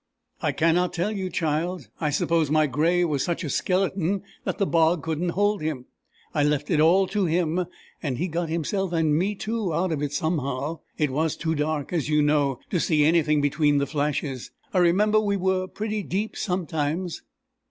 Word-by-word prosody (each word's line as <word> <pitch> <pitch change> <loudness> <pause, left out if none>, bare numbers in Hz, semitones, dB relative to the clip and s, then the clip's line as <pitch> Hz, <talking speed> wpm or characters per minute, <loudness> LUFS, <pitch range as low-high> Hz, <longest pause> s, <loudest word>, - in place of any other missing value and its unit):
"I - - +1
cannot 170 +2 +2
tell 180 +5 -1
you, 190 -3 -3
child. 165 - -2
I 155 - 0
suppose 155 +1 +1
my 155 0 +4
gray 165 +6 +2
was 145 -5 0
such 170 +1 -2
a 150 - -3
skeleton 190 +2 0 0.2
that - - -2
the 200 - +2
bog 165 -2 +2
couldn't 165 +2 -1
hold 205 -1 +2
him. 150 -5 -3 0.5
I 150 - +2
left 150 +2 0
it 160 - +3
all 175 +5 +5
to 195 -1 0
him, 170 +1 0 0.3
and 135 -7 -2
he 180 - -1
got 170 0 -2
himself 175 +3 -1
and 160 -3 +2
me 195 +6 0
too 215 -2 -2
out 170 +3 0
of 150 -3 -1
it 145 -1 -2
somehow. 145 -1 -2 0.2
It 150 -3 +1
was 155 +3 0
too 160 0 -1
dark, 150 0 -2
as 155 -4 -1
you 150 -1 +3
know, 145 -3 +2
to 180 - +1
see 155 -2 +3
anything 155 -2 +3
between 145 0 +2
the 140 - +2
flashes. 145 -2 -2 0.2
I 185 - +3
remember 205 +5 +4
we 200 -2 0
were 185 0 0
pretty 215 +2 -3
deep 205 +3 -3
sometimes." 170 -2 -2
165 Hz, 190 wpm, -25 LUFS, 150-185 Hz, 0.5 s, all